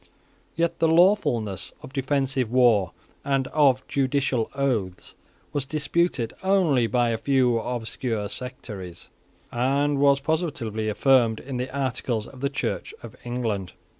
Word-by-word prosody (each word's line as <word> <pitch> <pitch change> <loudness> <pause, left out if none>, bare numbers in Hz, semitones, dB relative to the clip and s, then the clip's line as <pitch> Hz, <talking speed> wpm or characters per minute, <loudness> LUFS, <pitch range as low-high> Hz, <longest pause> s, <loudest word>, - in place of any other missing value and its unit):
Yet 170 +1 0
the 165 - +3
lawfulness 160 - +2
of 140 -3 -10
defensive 135 -3 0
war, 120 -6 +4 0.3
and 135 -1 0
of 135 -4 +3
judicial 135 -3 0
oaths, 115 -10 -2 0.4
was 145 - 0
disputed 150 -3 -1
only 175 -11 +3
by 120 -1 +1
a 115 - -2
few 125 -3 +2
obscure 115 -2 -3
sectaries, 100 -6 -7 0.4
and 140 +4 +1
was 140 -1 +4
positively 135 -9 -2
affirmed 115 -1 +3
in 130 -1 -6
the 125 +1 -3
articles 130 -4 -2
of 130 - -13
the 140 - +1
Church 140 - -3
of - - -10
England. 115 -6 -3
130 Hz, 130 wpm, -25 LUFS, 115-140 Hz, 0.4 s, war